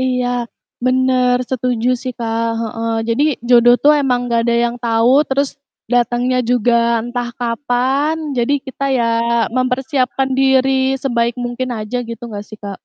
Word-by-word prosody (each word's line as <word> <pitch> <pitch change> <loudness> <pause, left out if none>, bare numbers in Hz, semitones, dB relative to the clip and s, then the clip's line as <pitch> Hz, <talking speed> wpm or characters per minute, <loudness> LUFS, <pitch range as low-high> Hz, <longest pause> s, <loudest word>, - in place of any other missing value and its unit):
Iya, 250 -1 0 0.6
bener 255 -1 +2
setuju 250 -2 -1
sih 255 -1 -4
Kak, 230 0 -2 0.2
heeh. 230 0 -3 0.2
Jadi 230 +5 +1 0.3
jodoh 240 0 +6
tuh 295 +1 +6
emang 250 -3 0
nggak 235 -1 +1
ada 235 0 +1
yang 235 - -4
tahu 230 +1 +2 0.2
terus 275 +1 +1 0.4
datangnya 245 +1 +1
juga 245 -1 +2 0.3
entah 240 0 -3
kapan, 255 +5 0 0.2
jadi 240 +3 +1
kita 270 +1 -5
ya 235 - +1 0.5
mempersiapkan 260 +1 0
diri 265 0 +3 0.3
sebaik 235 -3 0
mungkin 245 +1 -3
aja 215 +3 -4
gitu 230 - -7
nggak 205 -3 -7
sih, 215 - -10
Kak? 200 - -5
245 Hz, 145 wpm, -17 LUFS, 235-260 Hz, 0.6 s, jodoh